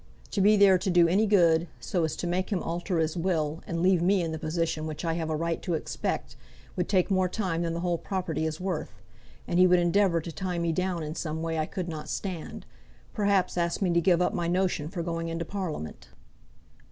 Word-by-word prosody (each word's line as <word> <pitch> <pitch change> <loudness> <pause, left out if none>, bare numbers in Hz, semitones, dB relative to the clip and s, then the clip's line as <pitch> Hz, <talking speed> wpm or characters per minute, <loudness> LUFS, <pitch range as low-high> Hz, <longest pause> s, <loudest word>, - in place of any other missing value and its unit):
To 200 - 0
be 210 +2 +5
there 195 -2 +6
to 190 - -2
do 175 -2 +5
any 200 +6 +3
good, 170 -4 +4
so 175 -3 -1
as 160 - -3
to - - -4
make 180 +2 -1
him 190 -4 0
alter 175 +2 -2
his 160 0 0
will, 165 -3 -1
and 170 0 -2
leave 185 -2 +4
me 185 +1 +3
in 165 - -2
the 160 - -4
position 160 0 -2
which 155 +2 -5
I 165 - +1
have 165 -1 -2
a 155 - 0
right 165 +1 -2
to 175 - -1
expect, 155 - -3 0.4
would 180 - -2
take 190 0 +2
more 185 -1 +2
time 180 -5 -2
than 165 -1 -1
the 170 - -3
whole 175 -2 0
property 175 -5 -2
is 155 0 -4
worth. 180 -4 -4 0.5
And 175 - +1
he 185 - +7
would 180 0 +5
endeavour 175 0 +3
to 165 +1 -6
tie 180 +1 -3
me 170 -1 0
down 180 0 -1
in 155 0 -4
some 160 -1 -4
way 165 -1 -1
I 155 - 0
could 185 -2 -4
not 155 -2 -6
stand; 185 -5 -5 0.5
perhaps 200 -4 +1
ask 170 0 0
me 185 -3 +1
to 170 - +3
give 175 0 +3
up - - 0
my 175 -4 -1
notion 180 -4 0
for 175 -2 -4
going 165 0 -3
into 165 0 -3
Parliament." 170 - -5
170 Hz, 230 wpm, -28 LUFS, 165-185 Hz, 0.5 s, he